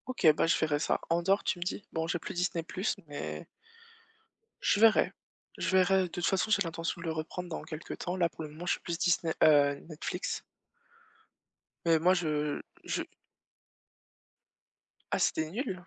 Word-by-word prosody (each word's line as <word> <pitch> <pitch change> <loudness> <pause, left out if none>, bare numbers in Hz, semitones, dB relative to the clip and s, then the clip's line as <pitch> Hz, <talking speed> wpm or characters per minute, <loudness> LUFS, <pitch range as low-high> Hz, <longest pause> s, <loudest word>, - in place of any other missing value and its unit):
OK, 255 -8 -3
bah, 160 - +2
je 165 - +3
verrai 150 -2 +1
ça. - - +1
Andor, 175 +4 +2
tu 180 - -1
me - - -1
dis? 185 +3 -3
Bon 160 0 -1
j'ai 175 - 0
plus - - -6
Disney+ 175 -2 -1 0.4
mais 145 0 -5 1.2
Je 205 - +2
verrai. 225 0 +5 0.5
Je - - -1
verrai. 190 0 +4
De - - -2
toute 175 0 -3
façon 195 +3 +1
j'ai 200 - +4
l'intention 165 +1 -3
de - - -7
le - - 0
reprendre 160 +3 -5
dans 160 - -5
quelque 155 0 -7
temps. 180 - -3
Là 175 -2 +2
pour 155 +2 -8
le 155 - -6
moment 155 +4 -9
je - - +2
suis - - -4
plus 170 -1 -3
Disney 170 -2 +2
heu, 145 -2 +5
Netflix. 155 -2 -4 1.4
Mais 165 -1 +5
moi 180 +3 +5
je 150 -4 -1 0.2
je - - -2 2.1
Ah - - +2
c'était 160 0 +1
nul? 190 -4 -3
170 Hz, 175 wpm, -31 LUFS, 155-185 Hz, 2.1 s, verrai